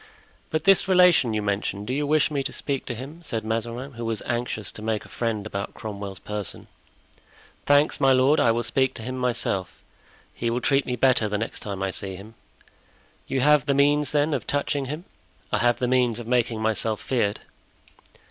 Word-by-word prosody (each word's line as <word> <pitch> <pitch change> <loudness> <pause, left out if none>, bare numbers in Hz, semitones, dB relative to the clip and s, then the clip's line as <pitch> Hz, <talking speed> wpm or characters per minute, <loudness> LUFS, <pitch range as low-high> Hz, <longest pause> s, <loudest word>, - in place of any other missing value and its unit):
"But 155 - -1
this 195 -1 +5
relation 180 - +5
you 105 - -1
mentioned—do 100 +2 -2
you 145 +1 -1
wish 155 0 +3
me 140 -2 0
to - - -3
speak 140 -2 -3
to 120 - -3
him?" 140 +8 -9
said 115 -9 -4
Mazarin, 115 +4 -3
who 120 -2 -7
was 115 -2 -2
anxious 120 -3 -2
to - - -10
make 110 -1 -2
a - - -15
friend 110 -3 -2
about 100 -2 -5
Cromwell's 100 -3 -6
person. 105 0 -6 1.0
"Thanks, 145 +1 +4
my 135 -1 +5
lord, 130 +4 +4
I 120 - +4
will 115 +1 +1
speak 130 +3 +1
to 110 - -6
him 130 +3 -4
myself. 120 -7 -2 0.5
He 115 - -2
will 120 +1 0
treat 135 +2 +1
me 125 - -1
better 125 -4 +3
the 105 - 0
next 110 +2 -4
time 100 -2 -5
I 95 - -1
see 95 0 -5
him." 100 +4 -11 0.9
"You 135 - 0
have 150 0 +4
the 140 - +2
means, 145 +1 +3
then, 150 +1 +2
of 130 -6 -3
touching 145 -1 -1
him?" 150 +7 -6 0.5
"I - - +1
have 120 0 +3
the 125 - -1
means 125 -3 +2
of 120 - -6
making 120 -2 0
myself 110 0 0
feared." 110 -5 -1
120 Hz, 195 wpm, -25 LUFS, 110-140 Hz, 1.0 s, this